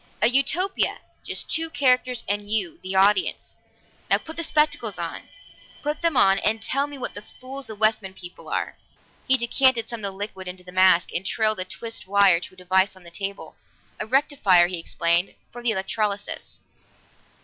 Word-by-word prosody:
A -, -, +5 dB
Utopia 335 Hz, +9 st, +2 dB, 0.3 s
just -, -, -3 dB
two 325 Hz, 0 st, 0 dB
characters 255 Hz, -4 st, +2 dB
and 205 Hz, 0 st, -2 dB
you, 320 Hz, +10 st, 0 dB
the 190 Hz, +1 st, -4 dB
audience. 200 Hz, +2 st, +2 dB, 0.5 s
Now, -, -, +5 dB
put 320 Hz, -, -10 dB
the 335 Hz, -, -2 dB
spectacles 305 Hz, -1 st, +1 dB
on. -, -, -6 dB, 0.5 s
Put 295 Hz, +1 st, -2 dB
them 335 Hz, -5 st, +1 dB
on 195 Hz, 0 st, +5 dB
and 220 Hz, +1 st, +1 dB
tell 275 Hz, +5 st, -1 dB
me 290 Hz, -1 st, -9 dB
what 255 Hz, -, -5 dB, 0.2 s
fools 265 Hz, +1 st, -7 dB
the 220 Hz, -, -7 dB
Westman 215 Hz, -2 st, +1 dB
people 175 Hz, -1 st, -10 dB
are!" -, -, -3 dB, 0.5 s
He 265 Hz, -, +5 dB
decanted 240 Hz, -1 st, +2 dB
some 235 Hz, -, -6 dB
of 200 Hz, -2 st, -3 dB
the 190 Hz, -, -14 dB
liquid 195 Hz, -2 st, -5 dB
into 180 Hz, 0 st, -6 dB
the 180 Hz, -, -12 dB
mask, 185 Hz, -1 st, +4 dB
and 175 Hz, -, -1 dB
trailed 215 Hz, 0 st, 0 dB
a 185 Hz, -, -2 dB
twisted 225 Hz, +1 st, -5 dB
wire 195 Hz, -3 st, +5 dB
to 185 Hz, -, -9 dB
a -, -, -34 dB
device 185 Hz, +2 st, +1 dB
on 185 Hz, -, -16 dB
the 170 Hz, -, -12 dB
table. 195 Hz, +2 st, -6 dB, 0.4 s
"A -, -, -4 dB
rectifier," 260 Hz, -, +4 dB
he 175 Hz, -1 st, -4 dB
explained. 170 Hz, +2 st, 0 dB, 0.2 s
"For 240 Hz, -, -9 dB
the 240 Hz, -, 0 dB
electrolysis." 205 Hz, 0 st, -3 dB
215 Hz, 180 wpm, -24 LUFS, 190-260 Hz, 0.5 s, A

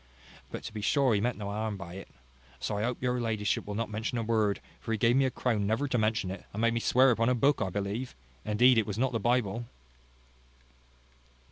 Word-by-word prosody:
But -, -, -7 dB
to -, -, -7 dB
be 105 Hz, -, -5 dB
sure 135 Hz, +2 st, +3 dB
he 100 Hz, -, +2 dB
meant 125 Hz, +2 st, 0 dB
no 100 Hz, -1 st, -5 dB
harm 105 Hz, 0 st, -2 dB
by 85 Hz, -2 st, -8 dB
it. 95 Hz, -, -8 dB, 0.5 s
So -, -, -2 dB
I 105 Hz, -, -1 dB
hope 125 Hz, +3 st, -2 dB
your 125 Hz, -1 st, 0 dB
ladyship 110 Hz, -4 st, -1 dB
will 105 Hz, -, -4 dB
not 115 Hz, 0 st, -2 dB
mention 110 Hz, +3 st, -2 dB
a 115 Hz, -, -1 dB
word; 110 Hz, -3 st, +1 dB, 0.2 s
for 115 Hz, -, -6 dB
he 110 Hz, -, +1 dB
gave 115 Hz, +3 st, +3 dB
me 135 Hz, 0 st, +4 dB
a -, -, +2 dB
crown 110 Hz, -5 st, -1 dB
never 115 Hz, +7 st, 0 dB
to 130 Hz, -, 0 dB
mention 110 Hz, -3 st, 0 dB
it, 95 Hz, -, -7 dB
and 105 Hz, -, -3 dB
made 115 Hz, 0 st, +3 dB
me 115 Hz, -, 0 dB
swear 130 Hz, +3 st, +4 dB
upon 115 Hz, 0 st, +2 dB
a 125 Hz, -, +3 dB
book, 140 Hz, +4 st, +3 dB
but -, -, 0 dB
I -, -, -3 dB
believe, 100 Hz, +6 st, -3 dB, 0.3 s
indeed, 115 Hz, +3 st, +4 dB
it 110 Hz, -, -1 dB
was 105 Hz, -1 st, -3 dB
not 130 Hz, +2 st, +1 dB
the 115 Hz, -, -1 dB
Bible." 120 Hz, 0 st, 0 dB
115 Hz, 240 wpm, -29 LUFS, 105-125 Hz, 0.5 s, me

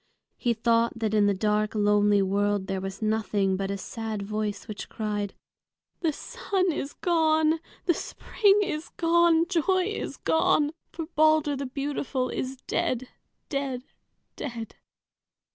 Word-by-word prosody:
He 240 Hz, -2 st, 0 dB
thought 230 Hz, 0 st, +2 dB
that 220 Hz, -2 st, -1 dB
in 210 Hz, -1 st, +4 dB
the 200 Hz, -, +3 dB
dark, 210 Hz, +2 st, 0 dB
lonely 205 Hz, -1 st, +4 dB
world 200 Hz, +1 st, +1 dB
there 190 Hz, -1 st, -3 dB
was 195 Hz, +2 st, -5 dB
nothing 210 Hz, -3 st, +1 dB
but 195 Hz, 0 st, -2 dB
a 200 Hz, -, -2 dB
sad 220 Hz, +1 st, -5 dB
voice, 210 Hz, 0 st, -3 dB
which 215 Hz, -, -7 dB
cried, 210 Hz, -2 st, -3 dB, 0.6 s
"The 330 Hz, -3 st, +1 dB
sun 370 Hz, +4 st, -1 dB
is 290 Hz, -2 st, -4 dB
gone! 315 Hz, -2 st, +2 dB, 0.3 s
The 350 Hz, -, +4 dB
spring 410 Hz, +4 st, +2 dB
is 320 Hz, -4 st, -3 dB
gone! 335 Hz, -1 st, +4 dB
Joy 370 Hz, +1 st, +2 dB
is -, -, -5 dB
gone! 300 Hz, -2 st, +2 dB, 0.2 s
For 330 Hz, -, -5 dB
Balder 310 Hz, -2 st, +3 dB
the 275 Hz, 0 st, -4 dB
beautiful 275 Hz, -1 st, -2 dB
is 260 Hz, +1 st, -3 dB
dead, 255 Hz, 0 st, -1 dB, 0.4 s
dead, 275 Hz, -4 st, -2 dB, 0.5 s
dead!" 235 Hz, -4 st, -6 dB
245 Hz, 140 wpm, -27 LUFS, 210-315 Hz, 0.6 s, in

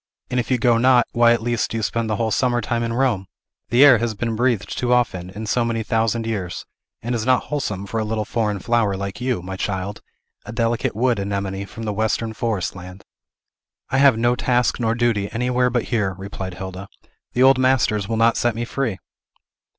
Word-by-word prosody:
And, 125 Hz, -, +1 dB
if 120 Hz, -, -3 dB
you 130 Hz, -, +2 dB
go 120 Hz, -1 st, +3 dB
not, 125 Hz, -1 st, +5 dB
why, 120 Hz, 0 st, +4 dB
at 120 Hz, -2 st, +1 dB
least, 120 Hz, -1 st, 0 dB
do 115 Hz, -, -3 dB
you 110 Hz, -, -2 dB
spend 110 Hz, +4 st, -1 dB
the 110 Hz, -, 0 dB
whole 110 Hz, 0 st, -1 dB
summer 120 Hz, +2 st, +1 dB
time 120 Hz, +1 st, -2 dB
in 115 Hz, 0 st, -2 dB
Rome? 115 Hz, -6 st, 0 dB, 0.4 s
The 120 Hz, +5 st, +6 dB
air 130 Hz, -5 st, +7 dB
has 115 Hz, -1 st, -2 dB
been 115 Hz, +2 st, -2 dB
breathed 120 Hz, -3 st, 0 dB
too 125 Hz, 0 st, -1 dB
often, 100 Hz, -8 st, +1 dB
in 105 Hz, +4 st, -7 dB
so 120 Hz, +3 st, +1 dB
many 115 Hz, -1 st, -1 dB
thousand 115 Hz, 0 st, 0 dB
years, 95 Hz, -7 st, -4 dB, 0.4 s
and 120 Hz, +2 st, -2 dB
is 115 Hz, -2 st, -1 dB
not 130 Hz, +1 st, +3 dB
wholesome 105 Hz, -10 st, -3 dB
for 115 Hz, +3 st, -3 dB
a -, -, 0 dB
little 110 Hz, 0 st, -2 dB
foreign 105 Hz, -3 st, -1 dB
flower 105 Hz, -1 st, +1 dB
like 100 Hz, +4 st, -5 dB
you, 125 Hz, -8 st, -1 dB
my 95 Hz, +1 st, -5 dB
child, 95 Hz, +1 st, -3 dB, 0.4 s
a 105 Hz, -, -8 dB
delicate 115 Hz, -1 st, -1 dB
wood 120 Hz, -1 st, +1 dB
anemone 100 Hz, 0 st, -3 dB
from 115 Hz, -, -9 dB
the 105 Hz, -2 st, -2 dB
western 110 Hz, +1 st, -1 dB
forest 110 Hz, -5 st, -2 dB
land." 90 Hz, +1 st, -10 dB, 0.9 s
"I 130 Hz, -, +2 dB
have 140 Hz, -4 st, +6 dB
no 120 Hz, +2 st, +2 dB
task 125 Hz, -1 st, +1 dB
nor 115 Hz, -1 st, +1 dB
duty 115 Hz, -4 st, 0 dB
anywhere 125 Hz, +1 st, +1 dB
but 120 Hz, -1 st, 0 dB
here," 100 Hz, -5 st, 0 dB
replied 95 Hz, -2 st, -6 dB
Hilda. 95 Hz, +1 st, -7 dB, 0.5 s
"The 125 Hz, -, +3 dB
old 135 Hz, 0 st, +6 dB
masters 115 Hz, -6 st, +2 dB
will 115 Hz, -, -1 dB
not 115 Hz, +1 st, +3 dB
set 120 Hz, -2 st, +1 dB
me 120 Hz, +1 st, -2 dB
free!" 120 Hz, -5 st, -2 dB
115 Hz, 210 wpm, -21 LUFS, 100-120 Hz, 0.9 s, air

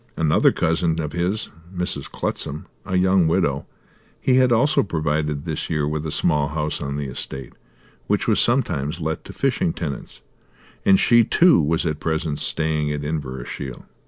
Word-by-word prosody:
Another 80 Hz, -2 st, +4 dB
cousin 80 Hz, 0 st, 0 dB
of 75 Hz, -2 st, -3 dB
his, 90 Hz, +5 st, -1 dB, 0.2 s
Mrs. 90 Hz, -1 st, -3 dB
Clutsam, 75 Hz, +2 st, -3 dB, 0.2 s
a 95 Hz, -, 0 dB
young 95 Hz, -2 st, +4 dB
widow, 80 Hz, -5 st, 0 dB, 0.5 s
he 130 Hz, -1 st, +3 dB
had 130 Hz, -1 st, +4 dB
also 130 Hz, +6 st, +4 dB
provided 75 Hz, -4 st, -1 dB
this 80 Hz, -2 st, -3 dB
year 75 Hz, -3 st, 0 dB
with 75 Hz, +1 st, -2 dB
a -, -, -3 dB
small 75 Hz, 0 st, +1 dB
house 75 Hz, 0 st, -2 dB
on 70 Hz, 0 st, -3 dB
the 70 Hz, -, -3 dB
estate 65 Hz, 0 st, -6 dB, 0.5 s
which -, -, 0 dB
was -, -, +3 dB
sometimes 75 Hz, +5 st, +1 dB
let 80 Hz, 0 st, -3 dB
to -, -, -8 dB
fishing 150 Hz, +6 st, 0 dB
tenants, 75 Hz, -, -6 dB, 0.7 s
and 95 Hz, -1 st, +6 dB
she, 120 Hz, -1 st, +5 dB
too, 170 Hz, -, +5 dB
was 80 Hz, +4 st, 0 dB
at 75 Hz, -2 st, -1 dB
present 80 Hz, -2 st, -2 dB
staying 75 Hz, 0 st, 0 dB
at 75 Hz, 0 st, -3 dB
Inverashiel. 65 Hz, -3 st, -5 dB
80 Hz, 160 wpm, -22 LUFS, 75-90 Hz, 0.7 s, and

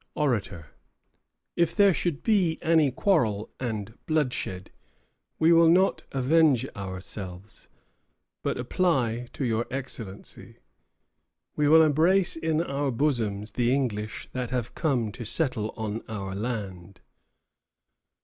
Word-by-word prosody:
ORATOR. 105 Hz, -, -1 dB, 0.9 s
If 170 Hz, -1 st, +1 dB
there 200 Hz, -2 st, +5 dB
should 155 Hz, 0 st, -2 dB
be 185 Hz, -8 st, +2 dB
any 160 Hz, -3 st, +4 dB
quarrel 125 Hz, -, +1 dB
and 110 Hz, -4 st, -4 dB
bloodshed, 130 Hz, -, -2 dB, 0.7 s
we 160 Hz, +1 st, +5 dB
will 165 Hz, 0 st, +6 dB
not 185 Hz, +3 st, +3 dB
avenge 140 Hz, 0 st, +3 dB
ourselves, 95 Hz, 0 st, -7 dB, 0.7 s
but -, -, -2 dB
apply 125 Hz, -4 st, 0 dB
to 135 Hz, -, -3 dB
your 115 Hz, 0 st, 0 dB
Excellency. 120 Hz, -7 st, -6 dB, 1.0 s
We 150 Hz, -1 st, +2 dB
will 160 Hz, +2 st, +7 dB
embrace 170 Hz, +5 st, +3 dB
in 160 Hz, 0 st, 0 dB
our 140 Hz, -3 st, -2 dB
bosoms 115 Hz, -6 st, -1 dB
the 120 Hz, +3 st, +1 dB
English 110 Hz, -6 st, -2 dB
that 125 Hz, -2 st, -3 dB
have 125 Hz, -2 st, -3 dB
come 125 Hz, -9 st, 0 dB
to 120 Hz, -, -8 dB
settle 115 Hz, -3 st, -1 dB
on 110 Hz, 0 st, -3 dB
our 100 Hz, -3 st, -5 dB
land. 100 Hz, -4 st, -5 dB
125 Hz, 115 wpm, -26 LUFS, 105-160 Hz, 1.0 s, will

